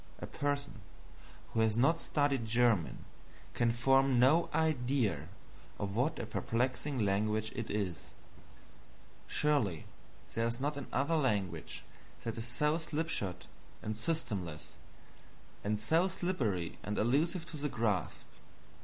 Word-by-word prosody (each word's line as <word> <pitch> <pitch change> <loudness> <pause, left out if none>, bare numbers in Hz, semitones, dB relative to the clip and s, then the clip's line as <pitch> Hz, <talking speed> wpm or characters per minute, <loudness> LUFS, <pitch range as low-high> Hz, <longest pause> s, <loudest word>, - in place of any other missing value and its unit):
A - - -6
person 140 -6 -2 0.7
who 115 - +1
has 110 0 +3
not 145 +7 +4
studied 145 -4 +1
German 115 -6 +2 0.5
can 120 -1 +2
form 135 +2 +4
no 140 +8 +5
idea 125 - +1 0.5
of 100 0 -3
what 140 +7 +1
a - - -3
perplexing 130 +5 -1
language 105 +2 +1
it 115 -1 -4
is. 100 -5 -1 1.3
Surely 130 - +1 0.5
there 115 0 +1
is 115 +1 -1
not 145 +2 -1
another 140 +3 0
language 100 - -1 0.4
that 115 -1 -3
is 115 +1 -3
so 150 +6 +1
slipshod 150 - -2 0.4
and 110 - -2
systemless, 105 - -2 0.9
and 105 +1 0
so 160 - +3
slippery 135 - -1
and 105 0 -3
elusive 160 - +2
to 155 - -6
the 150 0 -2
grasp. 105 - -1
120 Hz, 120 wpm, -33 LUFS, 105-145 Hz, 1.3 s, no